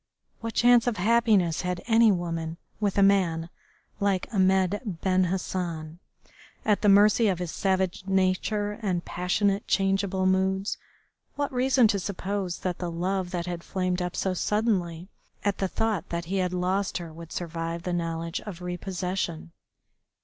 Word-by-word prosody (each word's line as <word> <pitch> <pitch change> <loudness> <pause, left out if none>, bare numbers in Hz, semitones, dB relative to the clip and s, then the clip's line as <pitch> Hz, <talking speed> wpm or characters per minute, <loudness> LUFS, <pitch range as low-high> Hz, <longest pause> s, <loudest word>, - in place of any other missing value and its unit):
What 230 0 -5
chance 245 0 +5
of 235 -3 0
happiness 210 -4 +3
had 180 -1 -3
any 225 -1 +5
woman 165 -3 -3 0.2
with 205 -2 0
a 200 - +6
man 175 -4 +2 0.5
like 200 -2 +1
Ahmed 190 0 +2
Ben 185 -2 +1
Hassan, 170 -3 -3 0.7
at 210 -2 +2
the 210 - +4
mercy 210 +3 +6
of 190 -3 +1
his 175 -2 -4
savage 190 -1 -1
nature 195 +3 0
and 180 -5 -1
passionate 195 +3 0
changeable 195 -1 +1
moods? 190 +1 +1 0.6
What 285 -2 -2
reason 255 -1 +4
to 205 -2 +1
suppose 190 -1 -3
that 180 -2 -2
the 175 - -3
love 180 +2 -1
that 175 -2 -3
had 175 -1 -5
flamed 185 -1 -1
up 180 0 -3
so 190 - 0
suddenly 185 -4 0 0.4
at 200 -1 0
the 195 - +1
thought 220 -1 -1
that 170 0 -3
he 190 +4 -2
had 180 -1 0
lost 185 +2 0
her 170 -3 -7
would 165 0 -11
survive 165 0 -4
the 180 - -2
knowledge 165 0 -2
of 200 -5 -8
repossession? 180 - -3
185 Hz, 155 wpm, -27 LUFS, 175-200 Hz, 0.7 s, a